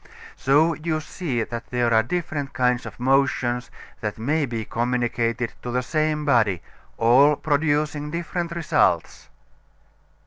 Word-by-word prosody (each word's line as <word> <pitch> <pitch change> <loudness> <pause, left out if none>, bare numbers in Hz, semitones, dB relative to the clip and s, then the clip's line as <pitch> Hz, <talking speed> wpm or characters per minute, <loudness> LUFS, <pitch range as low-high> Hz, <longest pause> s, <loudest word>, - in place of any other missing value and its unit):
So 150 +5 +3
you 155 0 -2
see 145 -6 -3
that 115 +1 -6
there 120 -1 +1
are 110 - +6
different 145 0 -3
kinds 125 -1 +1
of - - -11
motion 125 -2 +2 0.4
that 105 -1 -4
may 145 +6 0
be 115 -2 -4
communicated 120 0 -1
to 125 - -6
the 125 +1 -1
same 155 +2 0
body 110 - +2 0.3
all 130 +6 +5
producing 150 0 0
different 170 +1 -3
results. 170 -1 0
135 Hz, 130 wpm, -23 LUFS, 120-155 Hz, 0.4 s, are